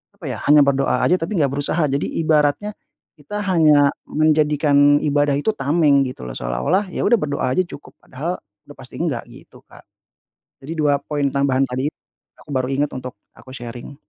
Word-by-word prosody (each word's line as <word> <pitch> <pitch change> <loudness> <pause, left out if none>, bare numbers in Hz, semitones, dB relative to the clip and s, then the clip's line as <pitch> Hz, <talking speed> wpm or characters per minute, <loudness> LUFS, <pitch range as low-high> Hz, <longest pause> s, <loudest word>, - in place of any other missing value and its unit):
apa 165 -10 -6
ya, 115 - -6
hanya 145 0 +7
berdoa 140 -1 +1
aja 180 +1 +3
tapi 165 +6 -3
nggak 140 - 0
berusaha. 145 +4 0
Jadi 140 +1 -1 0.2
ibaratnya, 155 +6 +1 0.5
kita 205 +8 -5
hanya 150 -5 +5 0.2
menjadikan 150 -2 +3
ibadah 145 -1 +2
itu 145 +10 0
tameng 145 -4 +2
gitu 130 - -8
loh, - - -6
seolah-olah 105 - 0
ya - - -4
udah 235 - +3
berdoa 140 -5 -2
aja 185 +7 +1
cukup 145 - -13
padahal 160 +8 -5 0.2
udah - - -14
pasti - - -9
nggak, - - -2
gitu - - -16
Kak. - - -16 0.8
Jadi 145 +5 -7
2 145 -3 +2
poin 145 -1 -4
tambahan 135 -1 +1
tadi, 130 +1 -2 0.5
aku 150 - -14
baru 130 -2 -1
ingat 140 +2 -1
untuk 130 -1 -7 0.2
aku 130 0 -13
sharing. 120 +2 -9
145 Hz, 175 wpm, -20 LUFS, 135-155 Hz, 0.8 s, hanya